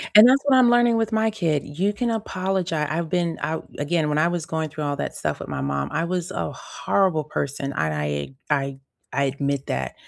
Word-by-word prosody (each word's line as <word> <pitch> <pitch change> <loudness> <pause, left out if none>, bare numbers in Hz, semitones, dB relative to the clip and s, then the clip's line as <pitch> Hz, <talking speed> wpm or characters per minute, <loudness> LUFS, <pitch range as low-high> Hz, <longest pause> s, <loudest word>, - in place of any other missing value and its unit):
And 215 +3 +11
that's 265 +2 +5
what 280 -2 +5
I'm 250 -2 +6
learning 240 -1 +4
with 225 0 0
my 220 0 +2
kid. 165 -9 0
You 185 +8 -1
can 235 +3 -1
apologi 190 -5 -1
I've 165 +1 -2
been 170 -2 0
I 160 +1 -1 0.2
again, 150 +1 0
when 150 - 0
I 155 +2 +4
was 175 -2 -2
going 160 -1 -2
through 155 0 -5
all 145 -1 -1
that - - -3
stuff - - -2
with - - -7
my 70 - -3
mom, 70 0 -1
I 165 - 0
was 180 0 -2
a - - -3
horrible 185 -6 0
person, 140 -2 -3
I 80 -9 0
I 75 - -3
I 140 -2 0 0.4
I 140 - +1
admit 140 0 -1
that. 65 0 -2
160 Hz, 220 wpm, -24 LUFS, 140-195 Hz, 0.4 s, And